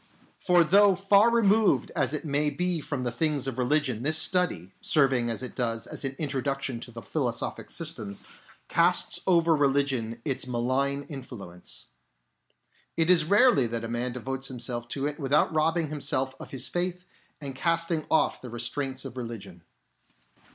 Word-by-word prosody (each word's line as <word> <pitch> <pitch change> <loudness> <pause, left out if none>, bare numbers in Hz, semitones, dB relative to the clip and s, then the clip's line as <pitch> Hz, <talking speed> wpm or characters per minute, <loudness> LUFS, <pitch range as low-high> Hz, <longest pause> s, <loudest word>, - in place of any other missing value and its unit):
For 175 -1 +4
though 200 +4 +5
far 200 +4 +4
removed 215 - +3
as 135 -2 +1
it 150 +1 -4
may 150 0 +1
be 175 +3 -1
from 145 -3 -4
the 120 - -1
things 145 +1 0
of 130 -2 -4
religion, 130 -3 +1
this 155 +4 +5
study, 160 - +2
serving 130 -5 +2
as 115 +2 -3
it 130 - -5
does 115 -2 -1
as - - -7
an 135 0 -2
introduction 135 -3 -2
to 120 - -9
the 115 0 -9
philo 140 -6 -1
sophic 115 - -5
systems, 125 - -4 0.4
casts 175 +1 +2
over 170 -3 +4
religion 135 -5 0
its 135 -2 -2
malign 130 +3 0
in 140 -3 -7
fluence. 95 -8 -8 1.1
It 165 +2 +3
is 165 -4 +4
rarely 205 - +4
that 115 0 -4
a - - -3
man 120 +2 -2
devotes 135 +2 -4
himself 120 -2 -3
to 135 +3 -3
it 150 +1 -3
without 145 +3 +2
robbing 160 0 +1
himself 135 -3 -1
of - - -9
his 130 -2 -3
faith 180 0 -2 0.3
and 140 -3 -6
casting 165 +2 0
off 160 - +2
the 125 - -8
restraints 130 +3 -3
of 130 -1 -8
religion. 115 -8 -7
140 Hz, 165 wpm, -27 LUFS, 125-165 Hz, 1.1 s, though